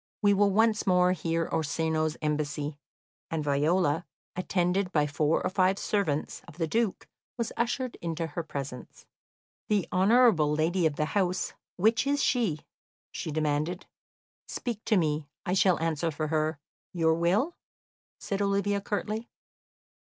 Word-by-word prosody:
We 205 0 +5
will 200 0 +4
once 215 +1 +2
more 180 -1 +4
hear 165 -2 -1
Orsino's 155 0 -1
embassy;" 150 0 -1 0.5
and 160 -2 -2
Viola, 150 +3 +2 0.3
attended 180 +1 0
by 150 -5 +2
four 150 +2 +1
or - - +1
five 190 0 +2
servants 170 -10 -1
of 170 - -13
the 165 - 0
Duke, 220 +4 -1 0.3
was 235 -2 -2
ushered 245 +1 -1
into 165 0 -2
her 160 +2 -4
presence. 140 -5 -7 0.6
"The 205 -4 +1
honourable 195 -5 +5
lady 165 +2 +2
of 150 - -3
the 150 - 0
house, 185 -3 0 0.2
which 220 +7 +2
is 285 0 +1
she?" 210 - +1 0.5
she - - -5
demanded. 155 +4 -1 0.6
"Speak 230 -3 -4
to 215 - +3
me; 150 -3 0 0.2
I 180 - 0
shall 185 -2 +3
answer 165 0 0
for 155 0 -3
her. 155 0 0 0.4
Your 165 -2 +3
will?" 190 - +1 0.6
said 200 0 -3
Olivia 200 0 +1
curtly. 215 +3 -3
175 Hz, 140 wpm, -28 LUFS, 155-200 Hz, 0.6 s, We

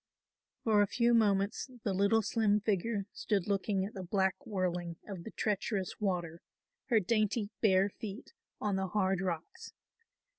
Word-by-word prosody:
For 215 -2 +4
a 205 - +3
few 235 +3 +2
moments 205 +1 +2
the 200 - 0
little 200 +4 +3
slim 210 -1 +2
figure 205 0 0
stood 200 -5 -1
looking 195 -1 0
at 205 - -7
the 195 - -6
black 190 +7 0
whirling 180 -4 -2
of 190 -5 -6
the - - -5
treacherous 205 -2 -2
water, 175 -5 -2 0.5
her 230 -4 +4
dainty 215 +1 0
bare 195 -2 +4
feet 210 - -8 0.3
on 205 -2 0
the 190 0 -1
hard 190 -1 +1
rocks. 175 -4 -4
200 Hz, 150 wpm, -32 LUFS, 190-215 Hz, 0.5 s, For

